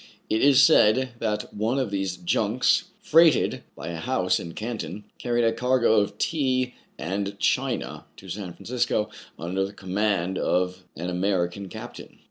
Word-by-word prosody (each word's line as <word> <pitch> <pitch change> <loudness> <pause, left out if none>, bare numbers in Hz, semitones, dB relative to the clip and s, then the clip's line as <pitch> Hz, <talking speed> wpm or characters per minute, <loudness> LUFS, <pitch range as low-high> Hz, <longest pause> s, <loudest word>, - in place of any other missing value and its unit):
It 110 - +2
is 140 -1 +6
said 130 -4 +5
that 105 -2 -2
one 110 +5 0
of 130 -6 -1
these 95 -2 -2
junks, 105 - +1 0.2
freighted 165 0 +4
by 80 - -7
a 85 - -4
house 105 -1 0
in 85 - -7
Canton, 105 -4 -5 0.2
carried 120 -1 0
a 115 0 +3
cargo 125 -2 +3
of 100 0 -2
tea 130 -5 0 0.2
and 100 +3 -3
china - - -1
to - - -12
San 95 -4 -5
Francisco 120 -2 -1 0.3
under 90 +4 -2
the 100 +1 -5
command 95 -1 -1
of 90 +1 0
an 90 +3 -4
American 90 +1 -1
captain. 110 +4 -10
105 Hz, 150 wpm, -25 LUFS, 95-120 Hz, 0.3 s, is